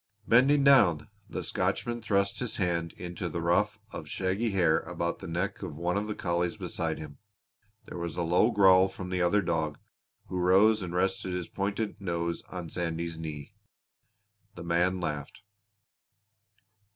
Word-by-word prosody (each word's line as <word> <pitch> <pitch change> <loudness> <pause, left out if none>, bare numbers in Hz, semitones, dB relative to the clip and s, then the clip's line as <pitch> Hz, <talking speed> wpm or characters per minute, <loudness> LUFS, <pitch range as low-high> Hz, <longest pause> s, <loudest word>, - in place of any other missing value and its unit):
Bending 135 +5 +5
down 100 - +5 0.2
the - - -4
Scotchman 120 0 -1
thrust 100 -2 0
his 125 -3 -2
hand 85 -3 -1
into 90 0 -5
the 85 - -4
ruff 90 +5 +1
of - - -7
shaggy 95 +5 -1
hair 90 -6 +3
about 85 0 -3
the 95 - -8
neck 90 +4 -2
of 90 -7 -6
one 90 +2 -1
of 105 +1 -1
the 105 - -3
collies 85 -1 -1
beside 80 -2 -3
him. 75 -2 -9 0.7
There - - -8
was 85 -1 -4
a 85 - 0
low 90 +7 +3
growl 95 -4 +6
from 90 -1 -8
the 90 0 0
other 95 +4 +3
dog, 80 -4 -1 0.5
who 90 - -4
rose 100 +5 +5
and 90 -1 -5
rested 95 0 0
his 90 -1 -3
pointed 100 +2 -3
nose 85 -2 -2
on 90 -3 -6
Sandy's 85 -1 -3
knee. 75 -3 -7 1.0
The 85 - -8
man 90 +2 +1
laughed. 75 +2 -5
90 Hz, 160 wpm, -29 LUFS, 85-100 Hz, 1.0 s, growl